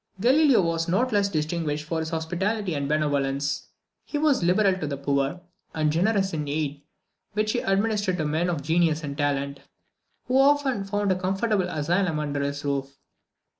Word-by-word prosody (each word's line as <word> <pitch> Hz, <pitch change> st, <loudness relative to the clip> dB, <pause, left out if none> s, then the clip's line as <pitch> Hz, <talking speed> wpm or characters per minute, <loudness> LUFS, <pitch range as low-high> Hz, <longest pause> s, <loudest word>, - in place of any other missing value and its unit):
Galileo 260 Hz, 0 st, +5 dB
was 165 Hz, 0 st, -1 dB
not 235 Hz, +9 st, +1 dB
less 200 Hz, -1 st, +2 dB
distinguished 155 Hz, -2 st, -2 dB
for 160 Hz, +1 st, -2 dB
his 160 Hz, 0 st, -3 dB
hospitality 180 Hz, +5 st, -2 dB
and 140 Hz, -2 st, -2 dB
benevolence; 145 Hz, -2 st, 0 dB, 0.4 s
he 295 Hz, -, -4 dB
was 290 Hz, -3 st, +2 dB
liberal 185 Hz, +3 st, +3 dB
to 155 Hz, -, -3 dB
the 140 Hz, -1 st, -3 dB
poor, 140 Hz, +4 st, -1 dB, 0.3 s
and 155 Hz, -1 st, +1 dB
generous 195 Hz, +3 st, +1 dB
in 150 Hz, -2 st, -2 dB
the 140 Hz, -, -4 dB
aid 145 Hz, -1 st, -2 dB, 0.5 s
which 215 Hz, +1 st, 0 dB
he 245 Hz, -, 0 dB
administered 200 Hz, -2 st, 0 dB
to 155 Hz, -, -1 dB
men 160 Hz, +4 st, 0 dB
of 160 Hz, -5 st, -2 dB
genius 165 Hz, 0 st, +2 dB
and 140 Hz, -1 st, -4 dB
talent, 140 Hz, -1 st, -1 dB, 0.7 s
who 255 Hz, +1 st, +2 dB
often 275 Hz, -6 st, +3 dB
found 205 Hz, 0 st, 0 dB
a -, -, +3 dB
comfortable 190 Hz, +1 st, 0 dB
asylum 170 Hz, +2 st, 0 dB
under 145 Hz, -1 st, -2 dB
his 140 Hz, +1 st, -3 dB
roof. 140 Hz, -1 st, -2 dB
165 Hz, 170 wpm, -25 LUFS, 145-200 Hz, 0.7 s, Galileo